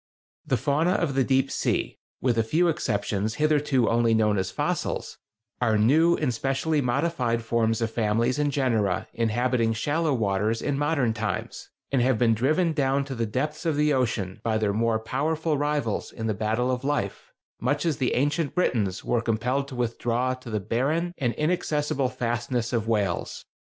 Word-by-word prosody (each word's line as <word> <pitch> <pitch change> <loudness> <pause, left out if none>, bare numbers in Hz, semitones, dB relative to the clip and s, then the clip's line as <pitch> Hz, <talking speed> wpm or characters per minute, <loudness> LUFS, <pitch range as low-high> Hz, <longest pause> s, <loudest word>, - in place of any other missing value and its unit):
The - - +2
fauna 150 +6 +1
of 170 -7 0
the 135 0 +2
deep 135 +1 +1
sea—with 125 -2 -2
a 115 - +3
few 165 +10 +2
exceptions 110 -6 -1
hitherto 150 -5 +2
only 115 0 +3
known 105 -2 +2
as 95 0 -1
fossils—are 110 +4 -3
new 155 +11 +4
and 140 -5 0
specially 135 +5 0
modified 125 -3 0
forms 115 -1 +1
of 115 - -1
families 115 +4 +1
and 145 -1 +1
genera 110 -7 0
inhabiting 115 0 +1
shallow 150 +8 0
waters 110 -2 0
in 145 - -1
modern 140 -5 +1
times, 110 -1 -4 0.2
and 135 -3 +2
have 130 -1 +2
been 115 0 +3
driven 155 - +1
down 140 -2 +1
to 135 - -5
the 115 -2 -2
depths 150 +8 -2
of 165 -3 0
the 150 0 +2
ocean 110 -8 -1
by 110 -1 +1
their 105 -2 0
more 115 +1 +1
powerful 150 +8 -1
rivals 145 -6 -1
in 110 - -6
the 110 - +1
battle 110 +5 0
of 125 0 -2
life, 145 +1 -2 0.3
much 145 +6 0
as 160 -3 +1
the 130 - 0
ancient 145 +4 0
Britons 105 - 0
were 120 - +1
compelled 125 +5 -1
to 135 - -8
withdraw 120 +1 -1
to 130 -1 -9
the 110 -1 -1
barren 150 - -1
and 125 -3 0
inaccessible 150 -4 0
fastnesses 120 0 -2
of 115 -2 0
Wales. 100 -6 -1
125 Hz, 170 wpm, -26 LUFS, 115-145 Hz, 0.3 s, new